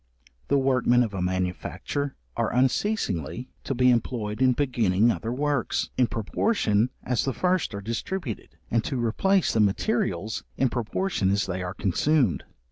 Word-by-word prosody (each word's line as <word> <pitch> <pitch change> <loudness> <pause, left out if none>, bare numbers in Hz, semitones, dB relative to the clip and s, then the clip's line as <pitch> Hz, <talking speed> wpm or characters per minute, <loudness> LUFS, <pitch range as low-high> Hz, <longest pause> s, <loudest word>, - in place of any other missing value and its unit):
The 140 - +3
workmen 125 -2 +3
of 110 -4 -4
a 95 - -3
manufacture 95 +10 -2 0.2
are - - 0
unceasingly 125 - 0
to 135 - -2
be 125 +1 +5
employed 115 -2 -1
in 130 -1 +5
beginning 120 -5 +2
other 115 0 -3
works, 145 +2 -1
in 125 - +3
proportion 110 - +1
as 125 -3 0
the 135 - -1
first 180 - 0
are 100 - -5
distributed, 115 - -4
and 115 -1 +2
to 135 - -2
replace 175 - +2
the 115 - +1
materials 100 -1 0
in 130 - +2
proportion 120 - -1
as 100 +1 +1
they 95 -1 -3
are 90 0 -4
consumed. 125 - +1
120 Hz, 150 wpm, -26 LUFS, 105-135 Hz, 0.2 s, be